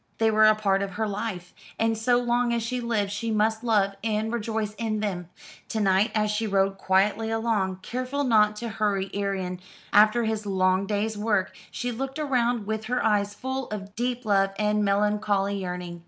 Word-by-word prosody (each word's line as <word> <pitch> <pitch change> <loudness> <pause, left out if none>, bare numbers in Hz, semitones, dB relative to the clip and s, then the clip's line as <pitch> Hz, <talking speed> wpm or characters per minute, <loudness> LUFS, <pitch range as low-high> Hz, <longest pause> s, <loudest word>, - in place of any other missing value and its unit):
They 225 0 +3
were 215 0 +6
a 215 - +6
part 195 -2 +1
of 200 -1 -3
her 220 +3 -1
life, 200 -3 -4 0.2
and 225 0 +1
so 240 +3 +2
long 240 0 +1
as 235 -1 0
she 250 +2 -2
lived 215 -4 -1
she 210 +3 -3
must 220 +1 +1
love 205 -4 +2
and 220 0 -1
rejoice 220 -2 -2
in 220 -2 -1
them. 180 -5 -3 0.4
To 220 - -2
night 195 +2 +3
as 210 -1 +1
she 220 +1 -1
rode 195 -1 +1
quietly 200 +4 +2
along, 220 -5 -1
careful 255 +3 -2
not 215 -4 +4
to 235 +2 -5
hurry 200 -3 -1
Arion 195 -3 -2 0.3
after 215 +3 +5
his 220 -1 -2
long 185 0 +2
day's 210 +1 -1
work, 205 -3 0
she 245 0 -3
looked 270 +4 -4
around 245 -5 +1
her - - -8
with 220 +2 -4
eyes 210 -4 +1
full 260 +2 -4
of 200 -1 -6
deep 245 +1 -2
love 195 -2 +3
and 210 0 +1
melancholy 200 -1 +1
yearning. 180 -1 -5
215 Hz, 185 wpm, -26 LUFS, 200-225 Hz, 0.4 s, were